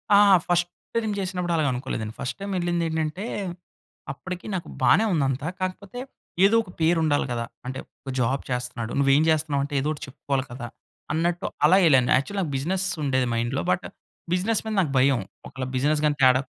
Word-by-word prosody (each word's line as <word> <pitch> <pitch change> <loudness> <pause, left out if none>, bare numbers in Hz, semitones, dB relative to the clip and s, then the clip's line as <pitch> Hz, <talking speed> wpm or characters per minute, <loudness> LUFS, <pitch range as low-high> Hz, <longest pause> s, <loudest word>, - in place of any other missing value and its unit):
ఆ! - - +8 0.3
First 175 0 +2 0.3
time 220 -2 0
చేసినప్పుడు 180 -2 -2
అలాగనుకోలేదండి. 130 -7 -1
First 130 - -3
time 200 0 -4
ఎళ్ళింది 175 -1 0
ఏంటంటే, 160 +4 -2 0.9
అప్పటికి 180 +7 -7
నాకు 175 - -4
బానే 220 - +5
ఉంది 150 -5 +2
అంతా. 135 +3 -2
కాకపోతే, 185 +5 -4 0.5
ఏదో 205 +3 +4
ఒక 200 - -15
పేరు 165 +1 +4
ఉండాలి 145 -2 +2
కదా. 115 -1 -2 0.2
అంటే 130 +1 -4 0.2
ఒక 135 - -7
జాబ్ 130 +3 +1
చేస్తున్నాడు. 125 -2 -3
నువ్వు 135 -1 +4
ఏం 150 - +4
జేస్తున్నావంటే, 145 -2 0
ఏదో 145 - -1
ఒకటి 150 - -9
చెప్పుకోవాలి 135 0 -2
కదా. 120 -1 -6 0.5
అన్నట్టు 170 +2 0 0.2
అలా 180 +5 +6
యేళ్ళాను. 130 -7 +5
యాక్చువల్లీ 195 +10 -2
నాకు 155 - -4
బిజినెస్ 185 +7 -1 0.2
ఉండేది 130 -2 +1
మైండ్‌లో. 120 +4 -1
బట్, 180 +1 0 0.5
బిజినెస్ 195 +5 +1
మీద 220 - -2
నాకు 155 -6 -1
భయం. 135 -1 +4 0.3
ఒకళ్ళ 130 -1 -5
బిజినెస్ 150 +3 +2
గాని 150 -1 +1
తేడా 130 0 +6
150 Hz, 175 wpm, -25 LUFS, 130-180 Hz, 0.9 s, ఆ